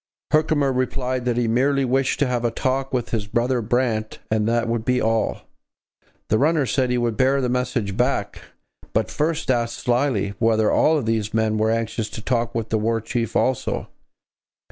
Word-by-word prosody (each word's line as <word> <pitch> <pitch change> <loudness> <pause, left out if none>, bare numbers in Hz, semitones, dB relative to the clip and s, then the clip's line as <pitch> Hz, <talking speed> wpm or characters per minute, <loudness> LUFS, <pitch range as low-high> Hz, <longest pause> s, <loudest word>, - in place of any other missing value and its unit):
Herkimer 150 -3 +2
replied 130 0 -1
that 120 -1 0
he 120 -1 +1
merely 135 +4 +2
wished 135 +1 +1
to - - +5
have 125 -2 -1
a 120 - +2
talk 130 +3 -1
with 125 -3 -1
his 110 -3 -2
brother 120 +3 0
Brant 115 -1 -1
and 110 -1 +1
that 115 0 +1
would 115 -1 -1
be 125 +1 +1
all. 110 -2 0 0.9
The 110 - +3
runner 150 0 +2
said 130 0 0
he 125 - +1
would 120 -2 0
bear 135 +2 +3
the 125 -2 0
message 125 -5 -1
back, 120 -4 -1 0.5
but - - 0
first 155 -2 0
asked 120 -2 -1
slyly 120 -5 0
whether 110 -1 +3
all 155 0 +3
these 110 -1 -1
men 110 -1 +1
were 110 +1 +2
anxious 115 -1 -1
to - - -7
talk 120 -2 -1
with 115 -1 -2
the 110 - +1
War 115 +1 0
Chief 115 0 -3
also. 130 -2 0
120 Hz, 185 wpm, -22 LUFS, 110-130 Hz, 0.9 s, to